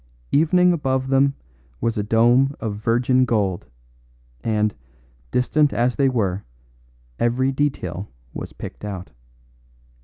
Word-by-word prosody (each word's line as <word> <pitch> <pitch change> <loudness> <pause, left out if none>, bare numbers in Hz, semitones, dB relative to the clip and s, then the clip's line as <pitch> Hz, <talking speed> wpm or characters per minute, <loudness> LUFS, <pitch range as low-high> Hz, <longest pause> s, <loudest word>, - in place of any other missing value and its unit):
Evening 180 +4 +4
above 130 -4 -1
them 135 +1 +3 0.4
was 115 0 0
a 105 - 0
dome 120 +6 +3
of 105 -3 -3
virgin 120 +3 +2
gold, 100 - 0 0.8
and, 105 -2 +1 0.6
distant 145 +4 +2
as 120 +1 +1
they 135 -1 +3
were, 100 -6 -1 0.8
every 125 +3 +2
detail 105 - -2 0.2
was - - -6
picked - - -9
out. 95 -3 -6
120 Hz, 115 wpm, -22 LUFS, 105-135 Hz, 0.8 s, Evening